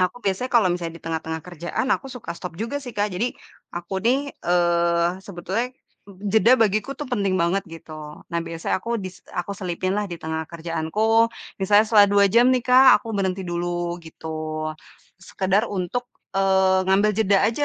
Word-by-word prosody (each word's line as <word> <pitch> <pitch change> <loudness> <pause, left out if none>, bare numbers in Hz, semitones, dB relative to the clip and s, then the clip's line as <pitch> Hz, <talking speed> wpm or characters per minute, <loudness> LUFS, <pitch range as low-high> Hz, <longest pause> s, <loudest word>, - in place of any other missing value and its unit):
aku 185 +6 0
biasanya 195 +6 0
kalau 225 -6 +5
misalnya 170 -2 -4
di - - -33
tengah-tengah 160 0 -3
kerjaan, 175 - -4
aku 270 - -7
suka 240 -8 -6
stop 180 -2 -7
juga 235 +6 -2
sih 245 - -7
Kak. 205 +1 +1
Jadi 230 +7 -1 0.4
aku 175 +2 -4
nih, 275 +4 +1
eee, 170 -1 +2 0.2
sebetulnya 200 +7 -3 0.6
jeda 230 +3 +6
bagiku 215 +5 +1
itu 295 - -5
penting 200 -5 0
banget 175 +3 +1
gitu. 165 -1 -11 0.4
Nah, 170 - 0
biasanya 165 +2 -2
aku 235 0 -1
dis 185 -1 -8
aku 175 +3 -3
selipin 185 0 -2
lah 210 - 0
di 170 - -4
tengah 160 0 -3
kerjaanku, 170 +8 +1 0.3
misalnya 205 +2 +5
setelah 210 -2 +7
2 200 0 +5
jam 240 +2 +6
nih 250 -2 +1
Kak, 255 +1 +7
aku 230 - -9
berhenti 190 -1 -1
dulu 175 0 -2
gitu. 155 -1 -5 0.5
Sekedar 195 +4 0
untuk, 205 +6 -3 0.3
eee, 190 -1 +3
ngambil 200 +2 +4
jeda 200 -2 +4
aja 235 +6 0
190 Hz, 170 wpm, -23 LUFS, 170-225 Hz, 0.6 s, setelah